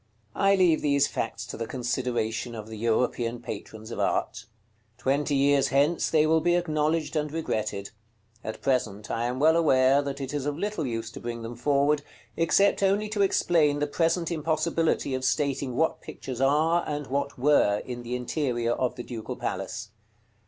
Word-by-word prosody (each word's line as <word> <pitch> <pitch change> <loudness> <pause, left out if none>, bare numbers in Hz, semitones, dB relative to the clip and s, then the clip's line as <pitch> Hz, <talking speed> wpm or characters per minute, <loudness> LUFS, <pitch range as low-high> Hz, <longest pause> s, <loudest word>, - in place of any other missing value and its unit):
§ - - -39 0.3
CXL. - - -4
I 195 0 +5
leave 180 -4 +3
these 140 -1 +3
facts - - -4
to - - -7
the 115 - -4
consideration 120 -1 -2
of 110 -1 -8
the 110 - -7
European 115 +1 0
patrons 110 -1 -8
of - - -5
art. 110 +1 -1 0.5
Twenty 140 +3 0
years 140 0 +3
hence 145 +5 +2
they 155 -1 +4
will 160 +1 +3
be 175 +2 +3
acknowledged 155 -2 0
and 150 -1 -1
regretted; 110 -10 -3 0.5
at 110 - -6
present, 110 -6 -1
I 115 - -1
am 125 +1 -2
well 160 +3 +5
aware, 135 -4 +4
that 140 -1 -5
it 135 0 -5
is 145 -1 -2
of 145 0 -2
little 200 -6 -2
use 115 -1 -4
to - - -9
bring 115 -1 -5
them 115 +1 -6
forward, 145 +3 +2 0.3
except 195 +5 +3
only 200 +2 +2
to 210 -1 -1
explain 165 -6 +3
the 145 - 0
present 165 +3 0
impossibility 160 -2 0
of 130 0 -2
stating 135 -1 0
what 160 +4 +1
pictures 130 -1 -7
are, 155 +5 +3
and 150 -1 -3
what 140 +1 -2
were, 125 -7 +3
in 120 -1 -6
the 120 +1 -4
interior 125 -2 -1
of 125 0 -1
the 120 - -6
Ducal 115 -3 -6
Palace. 110 -1 -4
140 Hz, 180 wpm, -27 LUFS, 120-155 Hz, 0.5 s, I